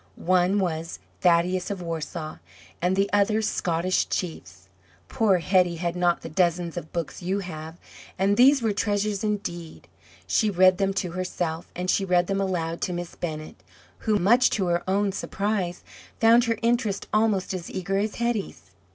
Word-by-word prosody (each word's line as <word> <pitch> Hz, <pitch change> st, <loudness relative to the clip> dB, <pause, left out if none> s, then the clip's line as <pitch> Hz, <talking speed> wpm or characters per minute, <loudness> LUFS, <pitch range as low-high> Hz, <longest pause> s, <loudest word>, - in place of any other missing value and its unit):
One 185 Hz, +2 st, +2 dB
was 165 Hz, -4 st, -2 dB, 0.2 s
"Thaddeus 180 Hz, +1 st, +2 dB
of 200 Hz, -2 st, -4 dB
Warsaw," 160 Hz, -2 st, -5 dB, 0.4 s
and 180 Hz, +2 st, +2 dB
the 195 Hz, +1 st, +2 dB
other 205 Hz, +1 st, +3 dB
"Scottish 185 Hz, -3 st, 0 dB
Chiefs." 95 Hz, -, -5 dB, 0.4 s
Poor 205 Hz, -4 st, +3 dB
Hetty 180 Hz, 0 st, +2 dB
had 170 Hz, +1 st, -2 dB
not 175 Hz, -1 st, +1 dB
the -, -, -5 dB
dozens 170 Hz, 0 st, 0 dB
of 155 Hz, -, -6 dB
books 170 Hz, -1 st, -4 dB
you 190 Hz, +3 st, -1 dB
have, 160 Hz, -2 st, -8 dB, 0.4 s
and 195 Hz, +2 st, +2 dB
these 265 Hz, +2 st, +5 dB
were 220 Hz, -2 st, +1 dB
treasures 205 Hz, 0 st, -1 dB
indeed. 175 Hz, -6 st, -4 dB, 0.4 s
She 215 Hz, -, +2 dB
read 185 Hz, -1 st, +4 dB
them 195 Hz, -1 st, +2 dB
to 180 Hz, -3 st, -2 dB
herself, 175 Hz, -2 st, -3 dB
and 180 Hz, +1 st, -3 dB
she 195 Hz, -, +2 dB
read 180 Hz, -2 st, +2 dB
them 195 Hz, +1 st, -1 dB
aloud 170 Hz, -3 st, -2 dB
to 180 Hz, -, -1 dB
Miss 175 Hz, 0 st, -5 dB
Bennett, 155 Hz, -2 st, -6 dB, 0.4 s
who, 215 Hz, -2 st, +1 dB
much 235 Hz, +7 st, +4 dB
to 195 Hz, -, 0 dB
her 170 Hz, 0 st, +1 dB
own 200 Hz, +1 st, +1 dB
surprise, 195 Hz, -2 st, -2 dB, 0.4 s
found 230 Hz, +1 st, +6 dB
her 230 Hz, -1 st, 0 dB
interest 230 Hz, -4 st, 0 dB
almost 210 Hz, -4 st, +1 dB
as 180 Hz, -2 st, -5 dB
eager 195 Hz, +1 st, -2 dB
as 210 Hz, +1 st, -2 dB
Hetty's. 230 Hz, -, -3 dB
185 Hz, 165 wpm, -25 LUFS, 170-205 Hz, 0.4 s, found